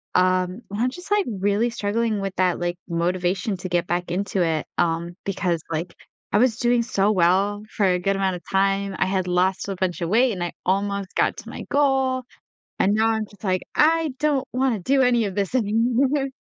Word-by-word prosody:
Um, 185 +1 +2
I'm 240 +5 +1
just, 360 +8 -11
like, 415 -1 +3
really 205 +3 +1
struggling 220 -1 -1
with 195 -1 -3
that, 180 -1 +2
like, 175 0 -2
motivation 180 +3 -1
to 180 - -5
get 175 -1 +1
back 175 0 -2
into 195 +1 -1
it, 160 -2 0
um, 170 0 0
because, 180 -4 -1
like, 165 +2 -3 0.4
I - - +3
was 230 0 +3
doing 240 -1 +2
so 205 -2 +1
well 195 +3 +2
for 205 - +2
a 180 -1 +2
good 195 +2 0
amount 190 -1 0
of 175 - -14
time, 195 0 +1
I - - +2
had 190 -1 -1
lost 185 +2 +1
a 195 - -3
bunch 180 -1 -2
of 170 - -1
weight, 245 +4 +4
and 185 -4 -5
I 175 - -4
almost 200 +1 -1
got - - +2
to - - -9
my - - -7
goal, 265 -2 +2 0.6
and 200 - +3
now 220 +1 +3
I'm 220 -1 0
just 205 0 -20
like, 185 -2 0
"I 320 -1 +3
don't 285 -3 +1
wanna 255 -3 +1
do 270 +7 +2
any 240 -3 +3
of 195 - -3
this 200 +4 -1
anymore." 250 +5 +2
200 Hz, 205 wpm, -23 LUFS, 180-235 Hz, 0.6 s, weight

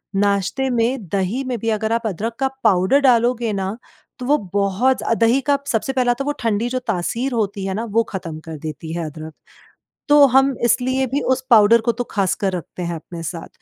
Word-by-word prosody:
नाश्ते 200 +6 +1
में 235 -2 0
दही 200 +8 -1
में 250 -2 -2
भी 230 - -2
अगर 220 0 -1
आप 230 0 -1
अदरक 220 +4 -3
का 270 - +2 0.2
पाउडर 195 +4 +4
डालोगे 240 -3 +3
ना 195 +2 -3 0.4
तो 250 - -5
वो 290 +3 +3 0.2
बहुत 205 +6 +2 0.2
दही 230 +4 +3
का 285 - +4
सबसे 245 +2 -1
पहला 250 -2 +2
तो 275 - -2
वो 290 - 0
ठंडी 230 +1 0
जो 255 +1 -1
तासीर 225 +6 -1
होती 200 -4 -2
है 190 - -2
ना 215 +4 -3
वो 230 - +5
ख़त्म 165 -5 -5
कर 160 -1 -7
देती 155 +1 -6
है 170 0 -3
अदरक, 155 +1 -8 0.8
तो 290 -1 +8
हम 270 +1 +3
इसलिए 260 +3 +1
भी 275 +4 -1
उस 260 - -7
पाउडर 230 -1 +6
को 235 +1 +1
तो 240 +2 -4
ख़ासकर 195 -1 0
रखते 180 +1 -7
हैं 170 0 -3
अपने 165 +1 -8
साथ। 165 0 -6
225 Hz, 205 wpm, -20 LUFS, 190-250 Hz, 0.8 s, तो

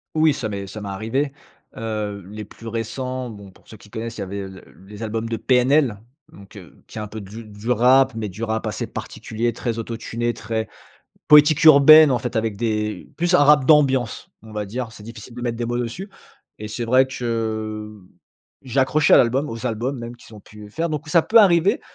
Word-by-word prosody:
Oui 155 -1 +4
ça 125 -6 -4
m'est 100 -1 -5
ça 105 +2 -8
m'est 100 - -6
arrivé. 115 +8 -2 0.5
Heu, 105 -2 -4
les 105 +1 -7
plus 115 +2 -13
récents 125 +3 -4
bon 100 -3 -11
pour - - -24
ceux 110 - -12
qui 105 - -18
connaissent, 115 +2 -6
il - - -5
y - - -2
avait 100 +1 -5
le 95 -1 -12 0.2
les 105 +2 -9
albums 110 +1 -3
de 115 - -2
PNL 130 -1 +2 0.4
donc, 100 +1 -15
heu, 95 -5 -14
qui - - -12
est - - -3
un 105 - -5
peu 110 +1 -8
de 100 +4 -10
du 105 +2 -6
rap 130 +3 +4
mais 110 -1 -3
du 105 +4 -8
rap 110 -1 -2
assez - - -4
particulier, 115 +2 -4
très 115 0 -4
auto-tuné, 115 +1 -3
très 110 0 -4 0.6
poétique 150 +1 +6
urbaine, 155 0 +8
en 125 - +2
fait, 125 +1 -5
avec 110 -2 -1
des 105 -2 -3
plus 175 +2 0
un 180 - +6
rap 145 -2 +5
d'ambiance, 135 -6 +2
on 110 0 -13
va 105 -1 -4
dire. 120 +3 -5
C'est 105 - -13
difficile 115 +1 -11
de 120 - -8
mettre 120 -2 -2
des 120 - -3
mots 120 +1 -2
dessus. 125 - -5 0.5
Et 105 - -7
c'est 120 +3 -4
vrai 130 +3 +4
que, 110 -4 -4 0.6
j'ai 130 +1 0
accroché 145 +3 +3
à - - +8
l'album, 130 +5 +2
aux 115 +1 -7
albums 125 +4 -2
même 120 0 -8
qu'ils 115 - -16
ont 105 - -12
pu, 105 +1 -14
heu, - - -11
faire. 165 +10 -3
Donc, 150 -1 -5
ça 170 +1 +4
peut 230 - +4
arriver, 185 -3 +4
115 Hz, 220 wpm, -21 LUFS, 110-130 Hz, 0.6 s, urbaine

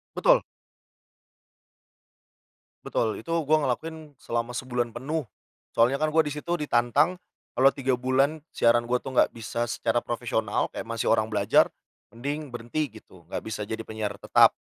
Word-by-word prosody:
Betul. - - +5 2.4
Betul, 110 -2 0
itu 165 - -6 0.2
gue 155 +1 +5
ngelakuin 155 +4 -3
selama 115 +1 -2
sebulan 125 -1 -2
penuh. 145 +7 -3 0.5
Soalnya 120 +4 +3
kan 155 +2 0
gue 160 - +3
di - - -2
situ 170 +3 -2
ditantang 145 +4 +2 0.4
kalo 135 +2 +6
3 135 -2 0
bulan, 135 +5 +1
siaran 120 0 +3
gue 125 +1 0
tuh 130 - -7
gak - - +4
bisa 115 +1 -3
secara 120 +1 0
profesional, 120 -2 -1
kayak - - -3
masih 115 -1 -3
orang 110 0 +2
belajar, 105 - +4 0.4
mending 140 +5 -4
berhenti 120 +4 -3
gitu, 90 -4 -19
gak - - -1
bisa 110 -1 -5
jadi 110 +2 -4
penyiar 110 -2 -3
tetap. - - +6
125 Hz, 150 wpm, -26 LUFS, 115-145 Hz, 2.4 s, kalo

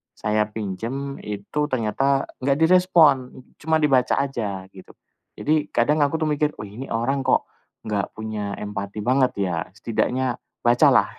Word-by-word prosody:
saya 105 0 0
pinjam 115 +7 -5
itu 105 +9 -3
ternyata 135 +2 +1 0.2
enggak 135 +1 +1
direspon 160 -7 +4 0.2
cuma 160 0 +1
dibaca 130 -3 +3
aja, 110 -9 -2
gitu. 95 - -14 0.4
Jadi 150 0 0
kadang 145 +6 +3
aku 145 +3 0
tuh - - +1
mikir, 150 0 0
"Wih 105 +2 -8
nih 135 - -6
orang 120 +5 0
kok - - +2 0.4
enggak 105 -3 -2
punya 105 -2 -4
empati 105 0 -5
banget 130 +1 +3
ya? 90 -3 -1 0.2
Setidaknya 125 +3 -1 0.2
baca 120 +5 +5
lah, 115 -6 +4
125 Hz, 145 wpm, -23 LUFS, 105-140 Hz, 0.4 s, baca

